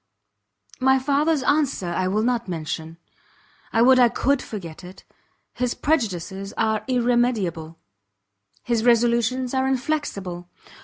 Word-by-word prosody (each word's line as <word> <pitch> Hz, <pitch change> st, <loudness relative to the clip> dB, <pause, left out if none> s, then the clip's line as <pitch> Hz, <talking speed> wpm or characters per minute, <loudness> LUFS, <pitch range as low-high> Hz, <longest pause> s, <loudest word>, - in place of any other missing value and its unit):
My 265 Hz, 0 st, +4 dB
father's 285 Hz, +2 st, +1 dB
answer 280 Hz, -, +1 dB
I 185 Hz, +2 st, 0 dB
will 210 Hz, +3 st, 0 dB
not 240 Hz, -2 st, 0 dB
mention; 160 Hz, -1 st, -5 dB, 0.7 s
I 225 Hz, -, +3 dB
would 255 Hz, +1 st, +6 dB
I 245 Hz, -1 st, +6 dB
could 275 Hz, +3 st, 0 dB
forget 175 Hz, -6 st, -8 dB
it! 180 Hz, +1 st, -12 dB, 0.5 s
his 245 Hz, 0 st, -2 dB
prejudices 195 Hz, -, -2 dB
are 220 Hz, -1 st, 0 dB
irremediable, 235 Hz, -10 st, 0 dB, 0.9 s
his 235 Hz, -2 st, 0 dB
resolutions 240 Hz, +1 st, +2 dB
are 265 Hz, 0 st, +1 dB
inflexible. 240 Hz, -, -3 dB
235 Hz, 115 wpm, -23 LUFS, 185-260 Hz, 0.9 s, would